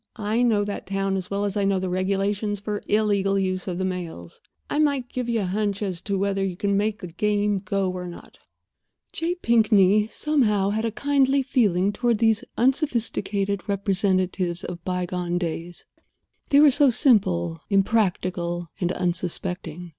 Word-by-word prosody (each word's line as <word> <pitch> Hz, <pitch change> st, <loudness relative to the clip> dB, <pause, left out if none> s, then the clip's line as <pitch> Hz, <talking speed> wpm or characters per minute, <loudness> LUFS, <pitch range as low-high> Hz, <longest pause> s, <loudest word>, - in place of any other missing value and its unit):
I 220 Hz, +1 st, -1 dB
know 220 Hz, -4 st, +3 dB
that 205 Hz, -, -5 dB
town 195 Hz, 0 st, -1 dB
as 185 Hz, -1 st, -4 dB
well 200 Hz, +1 st, -1 dB
as 200 Hz, 0 st, -2 dB
I 205 Hz, -, +1 dB
know 195 Hz, -1 st, +2 dB
the 185 Hz, -, -2 dB
regulations 195 Hz, +3 st, -1 dB
for 205 Hz, 0 st, -4 dB
illegal 200 Hz, -2 st, +2 dB
use 185 Hz, -1 st, -1 dB
of 180 Hz, -2 st, -3 dB
the 190 Hz, -, -1 dB
mails. 170 Hz, -, -6 dB, 0.3 s
I -, -, -1 dB
might 280 Hz, -5 st, +1 dB
give 250 Hz, -1 st, -3 dB
you 230 Hz, -2 st, +1 dB
a -, -, -1 dB
hunch 200 Hz, +2 st, -1 dB
as 185 Hz, -4 st, -3 dB
to 200 Hz, -2 st, -2 dB
whether 195 Hz, 0 st, 0 dB
you 190 Hz, -2 st, -2 dB
can 200 Hz, +1 st, 0 dB
make 210 Hz, +1 st, 0 dB
the 180 Hz, -, -5 dB
game 205 Hz, +3 st, 0 dB
go 195 Hz, 0 st, -1 dB
or 180 Hz, -1 st, -5 dB
not." 175 Hz, -, -12 dB, 0.7 s
J. 340 Hz, +2 st, -1 dB
Pinkney, 215 Hz, -, +4 dB
somehow, 220 Hz, -8 st, +1 dB
had 220 Hz, +2 st, -1 dB
a 225 Hz, -, -1 dB
kindly 275 Hz, +2 st, +2 dB
feeling 205 Hz, -8 st, +2 dB
toward 240 Hz, 0 st, +1 dB
these 225 Hz, +1 st, +2 dB
unsophisticated 225 Hz, -, 0 dB
representatives 185 Hz, -3 st, 0 dB
of 175 Hz, -1 st, -7 dB
by 180 Hz, -1 st, -2 dB
gone 175 Hz, 0 st, -2 dB
days. 170 Hz, 0 st, -5 dB, 0.6 s
They 285 Hz, -, +5 dB
were 295 Hz, -1 st, +7 dB
so 285 Hz, +1 st, +4 dB
simple, 90 Hz, -, +2 dB
impractical, 185 Hz, -4 st, 0 dB
and 175 Hz, -1 st, 0 dB
unsuspecting. 175 Hz, -1 st, -3 dB
200 Hz, 170 wpm, -24 LUFS, 185-220 Hz, 0.7 s, were